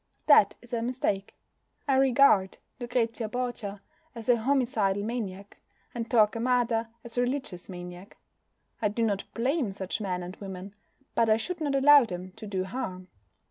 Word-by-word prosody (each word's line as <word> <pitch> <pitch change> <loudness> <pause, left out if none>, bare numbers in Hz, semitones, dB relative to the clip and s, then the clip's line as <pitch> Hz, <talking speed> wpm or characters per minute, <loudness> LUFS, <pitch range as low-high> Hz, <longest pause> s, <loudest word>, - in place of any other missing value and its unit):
That 215 -9 +6
is 240 - -14
a 230 - 0
mistake. 230 -5 -2 0.5
I 270 - +3
regard 265 -7 +4 0.2
Lucrezia 235 -2 -1
Borgia 225 -5 -4 0.3
as 230 0 -7
a 245 - +7
homicidal 225 -6 +1
maniac, 205 -4 -5 0.4
and 235 -2 -4
Torquemada 230 0 +2
as 235 +1 -4
a - - +4
religious 245 -9 -3
maniac. 180 +1 -9 0.6
I 215 - +3
do 215 +3 -1
not 205 -3 -1
blame 255 -1 0
such 190 +2 -4
men 180 -3 -2
and 180 +2 -7
women. 195 0 -8 0.4
But 230 -1 +2
I 215 - +5
should 345 +9 -4
not 285 -2 0
allow 280 0 +7
them 180 -2 -7
to 220 -1 -8
do 190 -2 -2
harm. 185 -3 -5
225 Hz, 155 wpm, -28 LUFS, 195-250 Hz, 0.6 s, a